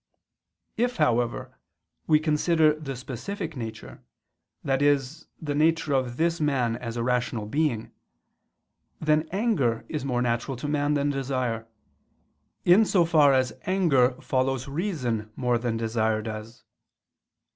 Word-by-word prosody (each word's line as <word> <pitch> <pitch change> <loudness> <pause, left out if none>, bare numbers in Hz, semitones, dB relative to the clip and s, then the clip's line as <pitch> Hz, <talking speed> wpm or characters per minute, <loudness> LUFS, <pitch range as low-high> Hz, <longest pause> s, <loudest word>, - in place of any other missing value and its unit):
If, 245 +1 0
however, 120 - 0 0.5
we 155 -1 +5
consider 155 0 +3
the 150 -3 -6
specific 155 - -6
nature, 115 -3 -7 0.6
i.e. 140 +1 +3 0.4
the 145 -2 -2
nature 155 0 +2
of 130 -2 0
this 165 0 +1
man 130 -6 +1
as 115 -1 -6
a 115 - -1
rational 125 -3 -1
being; 120 -2 -1 1.1
then 155 +1 +1
anger 175 - 0
is 150 -4 -3
more 125 -3 0
natural 120 +2 -1
to 135 - -5
man 145 0 +1
than 145 0 +1
desire, 130 -5 -2 1.0
in 180 +5 +7
so 185 -5 +3
far 155 -4 +5
as 130 -3 +1
anger 155 -10 +3
follows 130 0 -1
reason 135 - -2
more 125 -2 +1
than 115 -1 -2
desire 110 -1 0
does. 110 +1 -7
135 Hz, 125 wpm, -26 LUFS, 120-155 Hz, 1.1 s, in